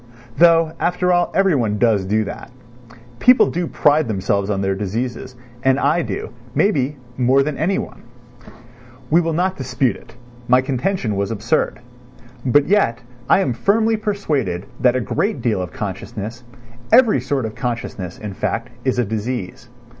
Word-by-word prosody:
Though, 165 0 +5
after 180 +1 +1
all, 175 0 +2
everyone 135 - +2
does 105 -4 +2
do 110 +3 +1
that; 100 - -8 0.7
people 250 0 +5
do 175 0 -2
pride 150 -2 +2
themselves 100 -1 -1
on 100 -2 -1
their 95 0 0
diseases, 115 +6 -4 0.3
and 130 +1 +2
I 155 +5 +2
do, - - -5 0.2
may 205 - +4
be, 140 -3 -1 0.2
more 130 +2 +3
than 150 0 -3
anyone. 175 +8 -2 1.1
We 170 +3 +5
will 165 -1 -1
not 185 +3 0
dispute 125 -4 0
it; - - -16 0.3
my 125 +1 +5
contention 130 - -1
was 100 0 -1
absurd. 115 +2 -1 0.6
But 140 +3 +3
yet 195 - +2 0.3
I - - +5
am 130 -10 0
firmly 220 - +2
persuaded 155 - -2
that 125 -1 +3
a 130 - +1
great 205 - -1
deal 110 -7 0
of 90 - -5
consciousness, 105 +4 -6 0.5
every 225 - +5
sort 130 -1 -1
of 110 - -5
consciousness, 115 -7 -4
in 105 -2 -6
fact, 115 +5 -3
is 130 -1 0
a 125 - +2
disease. 110 -1 -4
125 Hz, 155 wpm, -20 LUFS, 110-165 Hz, 1.1 s, Though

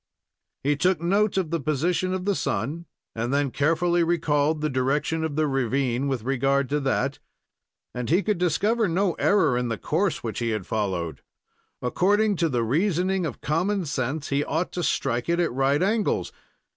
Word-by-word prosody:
He 145 +2 +2
took 180 +4 +2
note 195 +5 +1
of 175 -4 -1
the 170 - 0
position 160 +5 0
of 185 0 -3
the 200 - +2
sun, 155 - -2 0.3
and 115 +2 -2
then 140 -1 +1
carefully 170 +4 +2
recalled 155 -2 +1
the 155 - +1
direction 145 +4 0
of 160 -3 -2
the 155 0 +2
ravine 135 -1 0
with 130 -5 -2
regard 135 +1 +1
to 150 +1 +1
that, 135 0 -1 0.7
and 125 -1 -4
he 180 +6 +3
could 210 -4 0
discover 205 +6 +1
no 180 +2 +1
error 175 -11 +3
in 125 0 0
the 115 -2 -2
course 185 - -1
which 115 -2 -3
he 120 -1 -1
had 110 -4 -2
followed. 95 -6 -2 0.6
According 205 - +2
to 165 -1 +1
the 120 -4 0
reasoning 180 - +1
of - - -8
common 180 +5 0
sense, 140 +1 -2
he 140 +1 +1
ought 160 +5 -2
to 180 - -3
strike 125 -5 -1
it 170 +1 +2
at 170 -7 +1
right 135 +4 +2
angles. 215 +2 0
155 Hz, 180 wpm, -25 LUFS, 135-180 Hz, 0.7 s, he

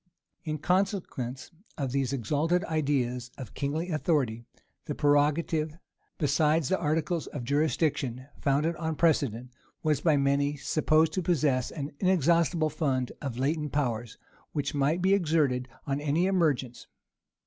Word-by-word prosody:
In 155 -2 -3
consequence 170 - -1 0.3
of 135 -3 -2
these 135 -1 0
exalted 150 - 0
ideas 130 -6 -1
of 130 - -8
kingly 155 +5 -2
authority, 135 -8 0 0.4
the - - -4
prerogative, 150 +2 +1 0.4
besides 150 0 +2
the 190 - +1
articles 155 +1 -1
of 140 - -6
jurisdiction 140 -2 0
founded 145 +4 +1
on 160 -1 -2
precedent, 130 -7 +1 0.3
was 155 -3 +1
by 155 -4 +3
many 140 +1 +1
supposed 155 +2 +2
to 185 - 0
possess 145 -7 +1
an 145 -1 -5
inexhaustible 170 -3 +2
fund 135 -5 -1
of 135 -5 -4
latent 150 +2 -1
powers, 120 -5 -1 0.4
which 145 -2 -2
might 150 +5 +1
be 190 +1 +4
exerted 150 -9 +1 0.2
on 140 +1 -2
any 150 +4 +1
emergence. 150 -10 0
150 Hz, 130 wpm, -28 LUFS, 135-160 Hz, 0.4 s, be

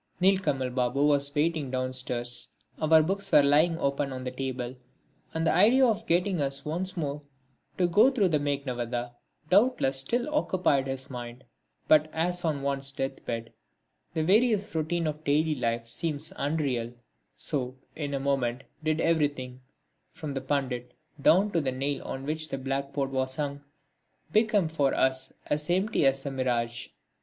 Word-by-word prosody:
Nilkamal 180 -10 +2
Babu 125 +3 +1
was 145 0 +2
waiting 155 -2 0
downstairs, 130 -1 0 0.2
our 160 0 +5
books 195 +4 -2
were 145 - +7
lying 155 +4 +4
open 140 -1 -1
on 130 -1 -5
the 125 - -4
table, 130 -1 -4 0.6
and 160 0 -1
the - - +3
idea 230 +9 +6
of 225 -1 0
getting 180 -1 +1
us 140 0 -1
once 180 +5 -1
more 145 -2 -3 0.6
to 180 - +3
go 205 +9 +5
through 220 -9 +2
the 155 -3 +2
Meghnadvadha 125 -4 -3 0.4
doubtless 195 - +4
still 240 - 0
occupied 180 - +1
his 135 0 -5
mind. 120 0 -7 0.4
But 155 0 +5
as 175 +2 -1
on 150 -4 -1
one's 140 0 -1
death 135 0 -4
bed 115 -1 -4 0.6
the 160 - +1
various 210 +3 +3
routine 165 +1 -1
of 155 0 -3
daily 155 +2 +2
life 115 -4 -1
seems 150 +5 -1
unreal, 135 -6 -1 0.4
so, 130 -3 -2 0.2
in 145 -2 -3
a - - -1
moment, 135 -2 -1 0.2
did 155 0 +1
everything, 145 -6 0 0.5
from 155 -3 -6
the 135 - -3
Pandit 130 -3 -2 0.3
down 195 +8 +4
to 170 - +1
the 135 -3 -1
nail 140 +2 -2
on 135 0 -5
which 155 +1 -2
the - - -3
blackboard 135 +1 -2
was 130 0 -1
hung, 145 -1 -4 0.7
become 215 -5 +3
for 145 -4 0
us 130 0 +1
as 150 +1 -1
empty 185 -4 +2
as 135 +1 +1
a 140 - -2
mirage. 120 -3 -1
145 Hz, 160 wpm, -28 LUFS, 130-165 Hz, 0.7 s, were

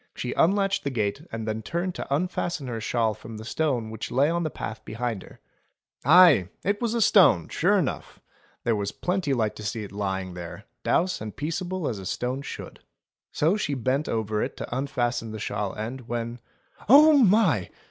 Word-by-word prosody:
She 125 - -3
unlatched 195 +1 +2
the 140 - -1
gate 110 0 -1
and 110 -1 -5
then 110 0 -2
turned 175 - -2
to - - -7
unfasten 170 -1 -1
her 115 -3 -4
shawl 115 -1 +1
from 110 +1 -10
the 110 - -8
stone 120 -4 -1
which 110 - -5
lay 140 +5 +2
on 170 0 0
the 160 - -1
path 110 -6 -6
behind 115 -2 -3
her. - - -15 0.6
Aye! 155 - +7
it 205 +3 0
was 235 -1 0
a 230 - +1
stone 110 - +5
sure - - +2
enough. - - -3 0.4
There 115 - +2
was 100 -1 -2
plenty 180 -5 -1
light 110 -5 0
to 105 - -8
see 110 +1 -3
it 100 - -9
lying 95 -2 -3
there, 85 -2 -8 0.2
douce 180 - +1
and 110 -1 -6
peaceable 175 +3 -3
as 110 -5 -3
a 95 - -6
stone 125 +5 -2
should. 145 - -8 0.5
So 165 +7 +2
she 145 -9 -1
bent 130 +4 -1
over 110 -1 -1
it - - -3
to - - -5
unfasten 120 -4 -2
the 110 - -6
shawl 100 -2 -3
end, 120 +3 -6
when 120 0 -4 0.2
— - - -23
"Oh 300 +4 +8
my!" 200 - +4
125 Hz, 195 wpm, -26 LUFS, 110-170 Hz, 0.6 s, Oh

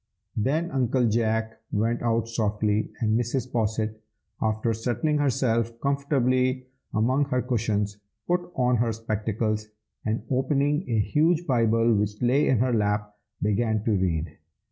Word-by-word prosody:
Then 150 +10 0
Uncle 125 -2 +2
Jack 110 0 0
went 115 +3 0
out 115 -1 +1
softly, 105 -1 0
and 110 -1 +2
Mrs. 125 +1 -2
Posset, 110 -1 -1 0.4
after 110 +1 0
settling 120 +7 0
herself 115 -4 +1
comfortably 130 -2 +1 0.3
among 130 +6 +2
her 130 -2 0
cushions, 105 -4 -1 0.3
put 175 0 0
on 125 -1 +2
her 115 0 +1
spectacles, 110 0 -2 0.4
and 110 0 -1
opening 140 +4 +1
a 115 - +1
huge 160 +9 +2
Bible 115 -3 +3
which 105 0 0
lay 130 +5 +3
in 130 - +3
her 125 +2 +1
lap, 105 -1 0 0.3
began 105 +1 +1
to 115 - +1
read. 85 -6 -1
115 Hz, 135 wpm, -26 LUFS, 110-130 Hz, 0.4 s, Bible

